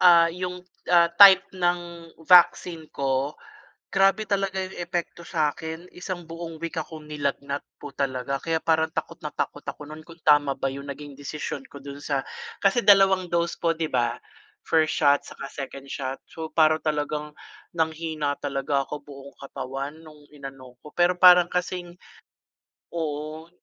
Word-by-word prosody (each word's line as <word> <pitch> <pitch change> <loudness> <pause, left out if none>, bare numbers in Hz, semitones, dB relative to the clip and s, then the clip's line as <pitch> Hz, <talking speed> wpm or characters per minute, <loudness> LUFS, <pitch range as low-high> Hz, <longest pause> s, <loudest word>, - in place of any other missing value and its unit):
ah, 170 -2 +7
yung, 180 0 -5 0.2
ah, 170 -1 +5
type 195 +1 +9
ng 175 -1 +1 0.4
vaccine 170 -2 +5
ko, 135 +2 -1 0.6
grabe 195 +3 +3
talaga 195 -2 -1
yung 185 -1 -8
epekto 170 -1 -4
sa 155 -2 +1
akin. 160 +4 -8
Isang 180 0 -6
buong 165 0 -8
week 170 0 -3
akong 155 0 -8
nilagnat 140 -1 -3
po 145 - -10
talaga. 135 -1 -2
Kaya 160 +1 -2
parang 160 -1 +2
takot - - -5
na - - -7
takot - - -4
ako - - -6
no'n 155 +1 -11
kung 165 0 -14
tama 145 -2 +4
ba 135 - -2
yung 140 +1 -8
naging 145 +1 -7
desisyon 145 +2 -5
ko 140 -1 -12
dun 140 0 -8
sa 140 -2 -2 0.4
kasi 200 +4 +2
dalawang 195 -2 +6
dose 170 0 -1
po, 165 -1 +1
'di 160 -1 -3
ba? 120 -2 +1 0.5
First 155 -1 +2
shot 145 -2 +3
saka 140 - -8
second 135 0 -8
shot. 135 -1 -4
So, 160 -1 -7
para 155 -1 +4
talagang 150 -1 -2 0.4
nanghina 160 -3 -1
talaga 140 -1 -1
ako, 150 - -6
buong 140 -1 -12
katawan, 140 +2 -6
nung 150 -1 -15
inano 135 -3 -11
ako. 150 +4 -14
Pero 175 +1 +2
parang 180 -1 +8
kasing 180 0 -3 1.0
oo. 155 0 -4
160 Hz, 155 wpm, -25 LUFS, 140-175 Hz, 1.0 s, type